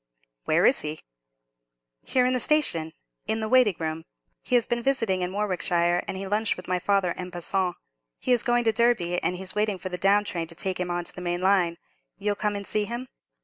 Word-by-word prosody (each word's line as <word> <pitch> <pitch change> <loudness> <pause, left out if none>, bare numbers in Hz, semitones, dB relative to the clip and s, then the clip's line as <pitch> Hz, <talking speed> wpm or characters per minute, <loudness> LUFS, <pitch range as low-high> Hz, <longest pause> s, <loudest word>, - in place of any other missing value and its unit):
"Where - - +3
is - - +5
he?" 155 +1 -4 1.0
"Here, 255 -1 +2
in 255 - +2
the 255 - +1
station—in 165 - 0
the 220 - -2
waiting 245 -5 +4
room. 160 0 -3 0.4
He 250 - 0
has 235 -1 +4
been 240 -1 -1
visiting 225 -8 +1
in 180 0 -2
Warwickshire, 180 -3 0
and - - -4
he 195 - -4
lunched 210 +2 +1
with 180 - -9
my 180 0 0
father 195 -2 +1
en 180 0 -5
passant; 180 +1 -2 0.4
he - - -1
is 245 - +4
going 240 -1 +2
to 225 - +3
Derby, 215 -7 +2
and 180 - 0
he's 185 +1 -2
waiting 210 -2 0
for 185 - -6
the 180 0 -5
down 200 +2 +4
train 170 -5 -4
to 165 - -8
take 185 +2 -1
him 180 -1 -2
on 175 0 -1
to - - -5
the 180 - -8
main 175 0 -2
line. 185 -3 +2 0.4
You'll 205 0 0
come 205 0 -1
and 200 0 -5
see 210 +1 0
him?" 240 +3 -6
190 Hz, 220 wpm, -26 LUFS, 175-220 Hz, 1.0 s, is